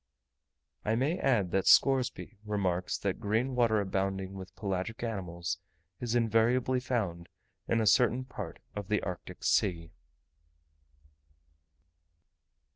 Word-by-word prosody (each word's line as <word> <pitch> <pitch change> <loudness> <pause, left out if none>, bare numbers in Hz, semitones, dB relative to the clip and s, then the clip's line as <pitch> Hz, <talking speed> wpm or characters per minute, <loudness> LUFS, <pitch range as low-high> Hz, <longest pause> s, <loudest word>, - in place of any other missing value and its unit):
I 110 +1 +1
may 140 +9 0
add 105 -10 +2
that 95 0 +1
Scoresby 130 -6 +3
remarks 95 -4 -1
that 100 -2 -2
green 115 +6 0
water 115 -3 +3
abounding 95 -1 -2
with 95 0 -9
pelagic 100 +2 -3
animals 90 -6 -3 0.4
is 120 -1 -2
invariably 120 +3 +2
found 100 -10 -2 0.4
in 115 - +2
a 110 - +1
certain 125 +3 +4
part 130 - -7 0.2
of 105 -2 -5
the 105 0 0
Arctic 90 -2 -6
Sea. 85 -5 +1
105 Hz, 115 wpm, -31 LUFS, 95-120 Hz, 0.4 s, certain